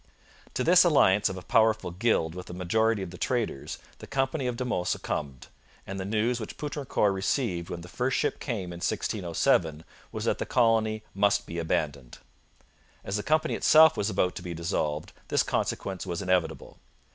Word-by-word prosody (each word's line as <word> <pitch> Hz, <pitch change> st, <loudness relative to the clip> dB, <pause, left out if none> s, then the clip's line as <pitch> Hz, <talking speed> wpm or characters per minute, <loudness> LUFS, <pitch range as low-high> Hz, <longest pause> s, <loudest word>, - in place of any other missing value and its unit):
To 125 Hz, -, 0 dB
this 180 Hz, +4 st, +7 dB
alliance 105 Hz, -, +4 dB
of 95 Hz, -, -5 dB
a 90 Hz, -, -8 dB
powerful 110 Hz, -5 st, +2 dB
guild 90 Hz, -4 st, +1 dB
with 90 Hz, 0 st, -8 dB
a 90 Hz, -, -7 dB
majority 105 Hz, +4 st, +1 dB
of 90 Hz, -, -7 dB
the 90 Hz, -, -11 dB
traders, 115 Hz, -, -2 dB, 0.2 s
the -, -, -10 dB
company 135 Hz, 0 st, -1 dB
of 120 Hz, -1 st, -2 dB
De 125 Hz, -, -2 dB
Monts 90 Hz, -7 st, -1 dB
succumbed, 70 Hz, -4 st, -3 dB, 0.4 s
and 95 Hz, 0 st, -6 dB
the 95 Hz, -, -3 dB
news 110 Hz, +4 st, 0 dB
which 110 Hz, -, -7 dB
Poutrincourt 140 Hz, -8 st, 0 dB
received 95 Hz, -3 st, -1 dB
when 85 Hz, -, -5 dB
the 85 Hz, -, -10 dB
first 125 Hz, +7 st, -1 dB
ship -, -, -1 dB
came 100 Hz, -9 st, -4 dB
in -, -, -7 dB
1607 85 Hz, -5 st, 0 dB, 0.3 s
was -, -, -4 dB
that -, -, 0 dB
the -, -, -2 dB
colony 110 Hz, -2 st, +2 dB
must 100 Hz, +1 st, +2 dB
be 85 Hz, -, -5 dB
abandoned. 70 Hz, -5 st, -2 dB, 0.9 s
As 95 Hz, -, -3 dB
the 105 Hz, -, 0 dB
company 155 Hz, +6 st, +1 dB
itself 160 Hz, 0 st, +6 dB
was 100 Hz, -, -1 dB
about 90 Hz, -4 st, +1 dB
to -, -, -6 dB
be 90 Hz, -1 st, -6 dB
dissolved, 80 Hz, -2 st, -2 dB
this -, -, +2 dB
consequence 95 Hz, -1 st, -2 dB
was 85 Hz, +1 st, -3 dB
inevitable. 90 Hz, -3 st, -1 dB
100 Hz, 180 wpm, -27 LUFS, 85-120 Hz, 0.9 s, this